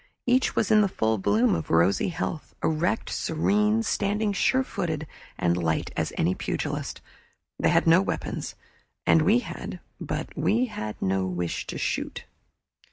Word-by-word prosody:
Each 250 +1 +2
was 215 - +1
in 215 -1 +7
the 205 - +3
full 110 - 0
bloom 105 +5 +3
of 80 - -3
rosy 85 +4 +3
health, 165 -2 -4
erect, 160 +7 0
serene, 210 +7 +1
standing 210 -1 0
sure 260 +6 +2
footed 160 - -3 0.3
and 85 0 +2
light 80 -2 -1
as - - -1
any 85 +3 +2
pugilist. - - -3 0.6
They - - +3
had - - +3
no 165 +3 +6
weapons, 195 - -4 0.5
and 165 - +5
we 215 +10 +4
had, - - -7 0.2
but - - -4
we 235 +4 +2
had 110 - -6
no 95 0 +1
wish 90 -2 -3
to - - -5
shoot. - - -3
160 Hz, 155 wpm, -26 LUFS, -, 0.6 s, in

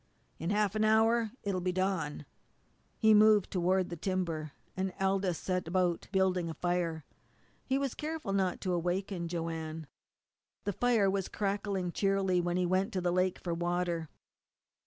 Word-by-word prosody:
In 165 - -2
half 205 -1 +2
an 215 0 +1
hour 220 +1 +4
it'll 195 -3 -1
be 180 +1 0
dawn." 180 -6 -1 0.7
He 220 -1 +5
moved 210 -1 +5
toward 185 0 +1
the - - -3
timber, 165 -4 -2 0.2
and 190 0 -1
Aldous 190 -2 +1
set 185 -2 -2
about 175 -1 0
building 185 -3 +1
a 160 - -5
fire. 170 -3 -1 0.6
He 265 - 0
was 275 -2 -1
careful 305 -9 -4
not 190 -2 0
to 185 - -1
awaken 175 +1 -1
Joanne. 165 -2 -4 0.8
The 205 - -1
fire 235 -2 +3
was 195 -1 0
crackling 200 -3 -2
cheerily 195 -1 +1
when 175 0 -1
he 180 - +2
went 190 +4 +1
to 185 - -1
the 175 0 +1
lake 185 +1 +1
for 175 - -3
water. 175 -1 -1
185 Hz, 155 wpm, -31 LUFS, 175-200 Hz, 0.8 s, He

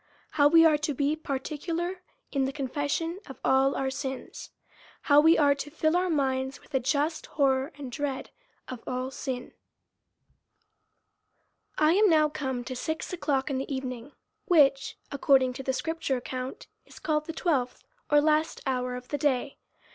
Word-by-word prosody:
How 290 -2 +5
we 330 +2 +7
are 305 -2 +5
to 300 -1 -2
he 285 +3 +1
particular 325 +5 -4 0.3
in 275 -2 +1
the 265 - -2
Confession 290 +5 -2
of 270 - -10
all 265 +1 +3
our 265 -1 -1
Sins. 265 -1 -6 0.5
How 290 0 +6
we 325 +2 +6
are 285 -2 +5
to 280 +1 -6
Jill 315 +2 0
our 365 +1 +1
minds 265 -3 0
with - - -22
a 265 - +3
just 290 +5 -1
horror 270 0 +2
and 275 -3 -7
dread 275 0 -4 0.4
of 255 -3 -7
all 255 +1 -3
Sin. 255 -2 -5 2.2
I 310 +1 +4
AM 415 +2 +5
now 310 -2 +4
come 265 -4 -3
to 255 +1 -6
six 315 +7 -4
o'clock 285 -5 -1
in 260 - -1
the 270 - -5
evening, 260 0 -5 0.3
which, 280 -8 +3
according 265 -2 +3
to 265 - -6
the 265 - -1
scripture 320 -1 -2
account, 255 +1 -6 0.2
is - - -17
called 305 -1 -1
the - - -3
twelfth, 280 -8 -1 0.3
or 295 - +6
last 310 +1 +1
hour 250 -2 -1
of 250 0 -9
the 290 - -2
day. 275 -1 0
280 Hz, 165 wpm, -28 LUFS, 265-310 Hz, 2.2 s, we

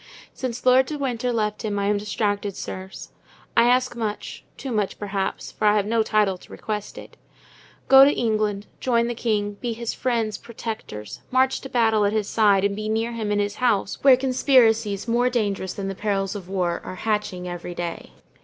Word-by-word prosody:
Since 250 -2 -5
Lord 255 +1 +5
de 305 - -4
Winter 250 -3 -1
left 210 -2 -1
him 210 -2 -2
I 200 - 0
am 205 0 +1
distracted, 205 -1 -2
sirs. 190 +1 -7 0.4
I 235 - +5
ask 250 0 +2
much, 215 -3 -4
too 270 - -5
much, 210 -4 -1
perhaps, 195 -1 -3
for - - -3
I 210 - +5
have 205 -2 +2
no 225 +1 +2
title 210 -4 +1
to - - -17
request 210 -2 -5
it. - - -11 0.7
Go 270 0 +9
to 280 - +6
England, 215 -4 0
join 235 -2 +2
the 240 - -2
king, 210 -3 -1
be 240 -2 -2
his 230 0 -4
friends, 230 -4 -1
protectors, 215 - -7
march 260 +1 +2
to 270 - -8
battle 225 -4 +3
at 205 +1 +1
his 215 -2 0
side, 205 -3 +3
and 200 0 +1
be 215 +1 -4
near 225 +2 0
him 220 -3 -3
in 205 - +1
his 205 0 -1
house, 220 -6 +1
where 270 -2 +8
conspiracies, 235 -6 +3
more 240 +2 +2
dangerous 200 -6 -1
than 195 -1 -4
the 195 - -3
perils 195 -1 -1
of 190 -3 -8
war, 180 -3 -1
are - - -7
hatching 210 -3 -2
every 175 0 -6
day. 170 -1 -5
215 Hz, 195 wpm, -23 LUFS, 200-235 Hz, 0.7 s, Go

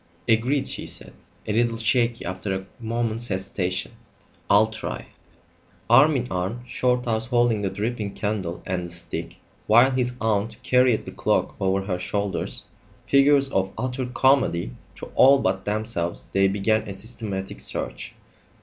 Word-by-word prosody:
"Agreed," 125 +5 +2
she - - -4
said, - - -6 0.3
a 105 - -2
little 115 +1 +1
shakily, 115 +1 +1
after 95 +2 -3
a 95 0 -5
moment's 115 0 -2
hesitation. 95 -1 -2 0.6
"I'll 105 +2 +6
try 110 0 -5 0.4
" - - -34
Arm 145 +5 +7
in 125 -2 -1
arm, 95 +7 -2
Shorthouse 125 -2 0
holding 120 -3 +2
the 100 - 0
dripping 105 +1 -3
candle 100 -5 -3
and 90 -1 -2
the - - -12
stick, 85 0 -6 0.3
while 120 +5 +6
his 125 -1 0
aunt 110 0 0
carried 125 -3 +3
the - - -7
cloak - - 0
over 95 0 +1
her 90 -2 -2
shoulders, 100 +1 -2 0.4
figures 140 0 +4
of 95 0 0
utter 130 0 -2
comedy 125 - +2 0.2
to - - -9
all 135 +2 +7
but 95 -7 -1
themselves, 105 -5 -2
they 95 0 +3
began 105 +2 0
a 100 - -4
systematic 100 -3 -5
search. - - -2
110 Hz, 150 wpm, -24 LUFS, 95-125 Hz, 0.6 s, Arm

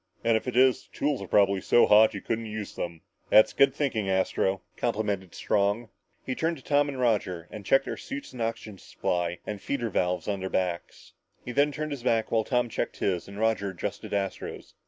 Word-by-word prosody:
And 115 -1 +3
if 110 - -1
it 125 -1 -2
is, 130 0 +4
the - - -18
tools 145 -5 0
are 100 - -6
probably 100 -1 +3
so 120 - +5
hot 110 +1 +6
you 100 - -5
couldn't 115 0 -3
use 105 -1 -5
them." 85 -2 -5 0.3
"That's 110 +1 +6
good 140 0 +5
thinking, 130 -8 -1
Astro," 95 0 0
complimented 105 -5 -2
Strong. 105 +3 0 0.4
He 130 - -2
turned 165 +5 -1
to 130 - -15
Tom 145 0 +2
and 135 -2 -5
Roger 95 -8 0
and 105 - -8
checked 135 +7 +3
their - - -4
suits 275 +1 -7
and 125 - -11
the 115 - +1
oxygen 110 -3 -5
supply 90 0 -2
and 105 -2 -5
feeder 120 -6 -2
valves 90 -2 0
on 100 -2 -1
their 95 0 -4
backs. 90 -2 -3 0.3
He 125 - -4
then 145 +3 +3
turned 155 +1 -4
his 140 -3 -4
back 115 -2 +1
while 115 -1 +2
Tom 125 +1 +1
checked 115 - -3
his, 90 -3 -1
and 100 0 -10
Roger 110 -2 +1
adjusted 95 -3 -5
Astro's. 100 -1 -4
110 Hz, 215 wpm, -27 LUFS, 95-125 Hz, 0.4 s, hot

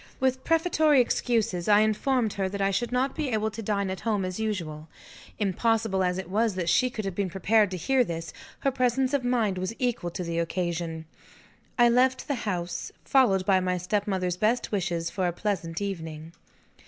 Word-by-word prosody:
With 260 0 0
prefatory 315 -3 +3
excuses, 230 -7 0
I 210 0 +6
informed 220 +1 +1
her 195 -2 -1
that 200 +1 -5
I 195 0 +2
should 235 +6 -1
not 260 +2 +1
be 300 -4 -2
able 220 -2 0
to 220 +2 -6
dine 200 -2 -1
at 190 - -5
home 210 -4 -1
as 185 +2 -4
usual. 165 -8 -3 0.5
Impossible 215 0 +1
as 180 0 0
it 190 -2 -5
was 210 +2 +1
that 175 -2 -1
she 255 - +3
could 215 -4 -5
have 195 - -2
been 195 +1 -1
prepared 205 +4 +2
to 185 - -4
hear 265 +7 +2
this, 165 -5 -5 0.3
her 275 - +2
presence 255 +1 +1
of 280 -3 +1
mind 225 -6 +1
was 185 +5 -3
equal 240 -8 -1
to 175 +1 -5
the 170 -1 -2
occasion. 170 -1 -2 0.7
I 240 -1 +6
left 255 +2 +2
the 285 - 0 0.2
house, 175 -2 -3
followed 200 -9 +3
by 190 -1 +4
my 180 0 0
stepmother's 185 -1 -1
best 220 +5 +1
wishes 175 -4 -1
for 185 -2 -1
a - - 0
pleasant 175 -3 -3
evening. 160 -5 -5
200 Hz, 190 wpm, -27 LUFS, 180-240 Hz, 0.7 s, I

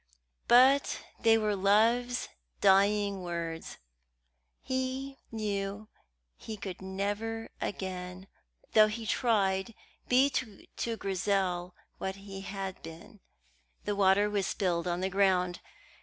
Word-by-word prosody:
But 260 +3 +5 0.2
they 225 -1 +5
were 215 -2 0
love's 230 +5 +2 0.3
dying 200 0 +3
words. 170 -2 -5 0.9
He 260 +1 -3
knew 210 -1 -3 0.5
he 220 -1 -8
could 190 -3 -7
never 205 +4 -3
again, 185 -1 -5 0.5
though 215 -1 +7
he 220 +1 -5
tried, 210 -2 +1 0.3
be 265 +3 +5
to 225 0 -4
Grizel 185 -2 -1 0.2
what 190 0 -3
he 195 -1 -9
had 195 -1 -5
been. 170 +7 -11 0.7
The 205 - -1
water 200 +1 +4
was 205 -2 -1
spilled 180 -3 -1
on 175 +1 -1
the 190 - +1
ground. 180 -3 +2
200 Hz, 110 wpm, -30 LUFS, 190-225 Hz, 0.9 s, though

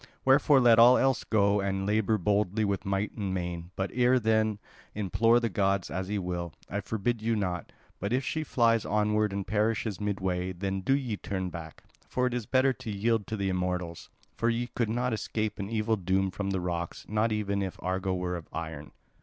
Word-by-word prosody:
Wherefore 135 +1 +5
let 120 -3 +6
all 120 +2 +8
else 135 -1 +2
go 100 -1 +2
and 95 0 -1
labour 110 +1 +2
boldly 105 +2 +1
with 100 0 -2
might 100 +1 0
and 100 -4 -2
main, 85 -1 -4
but 95 0 -2
ere 125 +1 +4
then 110 -2 +2 0.4
implore 115 +4 +3
the 120 - 0
gods 100 -2 0
as 95 +1 -3
ye 105 - -1
will, 90 -3 -3
I 100 +2 -3
forbid 110 +3 -2
you 115 +1 +1
not. 90 -4 -2 0.3
But 100 +3 -3
if 130 +2 +1
she 155 - -1
flies 115 -5 +2
onward 105 0 +1
and 100 -1 -3
perishes 110 0 0
midway, 95 -3 -1
then 95 +1 -3
do 135 +8 +2
ye 125 -7 -3
turn 95 -2 -4
back; 80 -2 -9 0.3
for 125 - 0
it 125 - 0
is 120 -4 -3
better 130 0 +3
to 115 - -8
yield 105 +1 0
to 110 - -3
the 100 -1 -1
immortals. 90 -2 -3 0.2
For 115 - 0
ye 120 +1 -1
could 115 -3 0
not 120 +1 0
escape 110 -1 -2
an 100 0 -4
evil 110 0 0
doom 95 +1 0
from 100 +1 -3
the 95 -2 -1
rocks, 85 -1 -4
not 110 +2 +1
even 100 -2 -1
if 95 -2 -3
Argo 95 +1 -1
were 90 0 -2
of 85 -2 -7
iron." 80 -3 -6
105 Hz, 205 wpm, -29 LUFS, 95-115 Hz, 0.4 s, all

